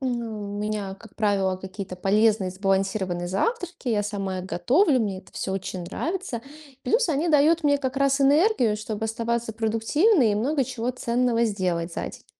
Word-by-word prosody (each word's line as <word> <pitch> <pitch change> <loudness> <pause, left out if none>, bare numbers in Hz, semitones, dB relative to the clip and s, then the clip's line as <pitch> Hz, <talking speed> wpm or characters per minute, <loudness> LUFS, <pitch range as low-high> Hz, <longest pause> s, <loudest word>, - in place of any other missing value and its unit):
У 265 - -2 0.5
меня, 210 -2 -3
как 205 0 -16
правило, 195 -3 +1
какие-то 190 0 -7
полезные 205 0 +2
сбалансированные 190 -2 -1
завтраки. 350 - -2
Я 210 -3 +1
сама 195 -2 -3
их 180 - -8
готовлю, 260 - +2
мне 200 -3 -2
это 185 - -17
всё 190 - -3
очень 185 -1 -4
нравится. 290 - -4 0.4
Плюс 460 -3 +2
они 315 +3 +1
дают 310 +2 +4
мне 285 -1 +4
как 260 -1 -3
раз 275 0 +2
энергию, 275 - +4
чтоб 215 0 -5
оставаться 230 +1 -2
продуктивной 225 - +2
и - - +1
много 270 +6 +1
чего 245 -1 -3
ценного 240 -1 +1
сделать 180 -5 -1
за - - -3
день. - - -13
220 Hz, 165 wpm, -25 LUFS, 195-275 Hz, 0.5 s, дают